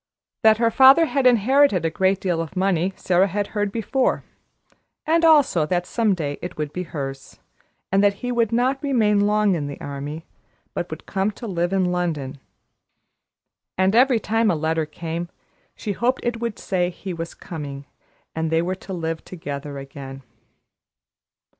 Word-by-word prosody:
That 220 -1 +6
her 230 0 +2
father 270 +6 +7
had 275 -4 +2
inherited 245 -4 +4
a 165 - +1
great 190 +2 +1
deal 175 -3 -1
of 165 +2 -7
money, 185 -1 +1
Sara 185 +2 +2
had 205 +1 -2
heard 205 -1 -1
before; 245 +4 0 0.8
and 330 +2 +2
also 290 - +5
that 175 +1 0
some 220 -2 +1
day 145 -4 -4
it 175 - -7
would 150 -1 -4
be 180 - -3
hers, 135 -5 -6 0.5
and 195 +1 +3
that 200 0 +4
he 245 +4 -4
would 235 -2 +1
not 255 +3 +1
remain 225 -8 +2
long 210 -1 +3
in 150 -5 -2
the 140 - -7
army, 145 +3 -6 0.5
but - - -3
would - - -8
come 195 +1 0
to 215 +3 -9
live 175 -4 -1
in 190 -1 +2
London. 155 -6 -2 1.4
And 190 +1 +3
every 250 -1 +5
time 225 +1 +1
a 175 - +2
letter 160 0 -1
came, 165 +2 -5 0.5
she 210 - -4
hoped 240 +6 -1
it 240 -1 -1
would 235 -2 -3
say 180 -2 -1
he 185 +1 -7
was 165 0 -6
coming, 145 -4 -7 0.5
and 160 0 -2
they 165 +1 +2
were 180 +2 -1
to 190 - -7
live 165 -2 -3
together 145 -4 -6
again. 135 -1 -9
185 Hz, 170 wpm, -22 LUFS, 160-225 Hz, 1.4 s, father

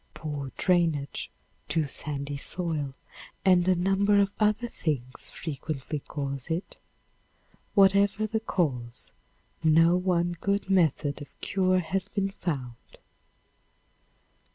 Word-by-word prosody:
Poor 145 -4 -5
drainage, 165 -6 +1 0.4
too 160 -2 +1
sandy 140 0 -3
soil 150 -2 -2 0.5
and 180 -2 +5
a 185 - +5
number 195 +3 +3
of 200 0 +3
other 215 +3 +2
things 135 - -3
frequently 150 -1 -4
cause 140 -1 -5
it. 165 +4 -3 1.0
Whatever 200 +1 +5
the 220 +1 -1
cause, 125 - -2 0.5
no 165 +2 +5
one 175 -1 +1
good 200 -1 0
method 155 -5 +2
of 145 - -7
cure 185 -1 +2
has 185 +3 -1
been 200 -1 -2
found. 135 -11 -5
170 Hz, 105 wpm, -28 LUFS, 145-195 Hz, 1.0 s, and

